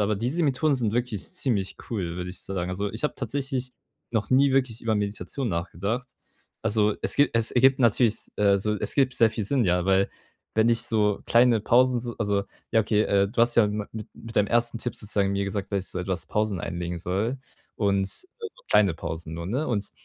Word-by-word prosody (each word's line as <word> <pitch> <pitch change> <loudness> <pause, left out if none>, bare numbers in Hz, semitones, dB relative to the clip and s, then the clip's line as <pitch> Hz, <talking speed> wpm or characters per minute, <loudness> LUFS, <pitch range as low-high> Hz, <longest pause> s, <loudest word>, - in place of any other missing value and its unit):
aber 105 +1 +2
diese 125 - -1
Methoden 145 +1 +2
sind 115 -5 0
wirklich 120 -4 -2
ziemlich 115 - -1
cool, 90 -7 -3
würde 90 0 -4
ich 95 - -7
so 95 - -5
sagen. 90 -1 -2
Also, 100 +2 -3
ich 110 - -7
habe 150 - 0
tatsächlich 130 0 -3 0.4
noch 110 -2 -1
nie 135 +1 +4
wirklich 130 -4 +1
über 110 -1 +1
Meditation 105 +4 -3
nachgedacht. 100 +7 -3 0.6
Also, 105 0 +2
es - - +1
gibt 140 -4 +3
es 115 -1 +2
ergibt 130 +1 +4
natürlich, 115 -1 +4 0.2
äh, 100 -1 +4
so 105 +2 -1
es - - -2
ergibt 130 -3 +2
sehr 115 - +5
viel 110 - -3
Sinn, 125 +4 +1
ja, 90 -1 +2
weil 95 +1 +3 0.5
wenn 110 +1 +3
ich 115 -1 +2
so 105 -3 +1
kleine 120 -1 +4
Pausen, 125 +3 +4
so 120 0 -5
also 100 -2 0 0.3
ja 110 - +4
okay, 105 0 +2
äh, 100 -2 +2
du 115 +3 -1
hast 120 0 +3
ja 115 -3 +6
mit 105 0 -3 0.3
mit 115 0 -11
deinem 105 - +4
ersten 120 +1 +1
Tipp 120 0 -3
sozusagen 100 -1 -1
mir 100 0 0
gesagt, 100 +1 -4
dass 95 -2 -1
ich - - -11
so 90 - -4
etwas 95 0 -3
Pausen 105 -4 -1
einlegen 85 0 -4
soll 100 +9 -1 0.4
und 100 -2 +1
so 450 - -10
kleine 100 -5 +4
Pausen 80 0 -6
nur, 85 +1 -5
ne? 130 +11 -1
Und 105 -6 -2
110 Hz, 215 wpm, -26 LUFS, 100-125 Hz, 0.6 s, ja